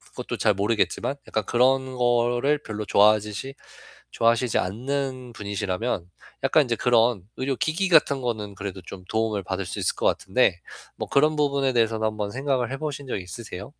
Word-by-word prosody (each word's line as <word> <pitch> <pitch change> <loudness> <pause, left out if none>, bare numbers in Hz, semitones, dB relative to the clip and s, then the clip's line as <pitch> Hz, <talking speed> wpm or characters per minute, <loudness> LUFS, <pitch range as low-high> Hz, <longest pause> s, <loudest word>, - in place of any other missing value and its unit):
것도 - - -4
잘 105 - +3
모르겠지만 110 +6 0
약간 110 -3 -1
그런 130 +1 +2
거를 120 +3 +2
별로 105 -1 -5
좋아하듯이 105 +6 +2 0.6
좋아하시지 115 +1 +2
않는 130 +4 -3
분이시라면 100 -1 -3 0.4
약간 155 -3 +4
이제 120 - 0
그런 115 -4 +3
의료기기 155 +8 -1
같은 145 -5 +4
거는 110 -4 -3
그래도 100 -2 -6
좀 90 -2 -10
도움을 110 -2 0
받을 95 +1 -3
수 - - -5
있을 - - 0
것 - - -3
같은데, 95 -3 +1 0.3
뭐 - - -5
그런 150 +3 +3
부분에 140 -2 +1
대해서는 110 -2 +2
한번 105 -1 -3
생각을 130 -2 -1
해 135 - -3
보신 145 -2 -5
적 - - -2
있으세요? 95 +1 -8
120 Hz, 375 characters per minute, -25 LUFS, 105-135 Hz, 0.6 s, 약간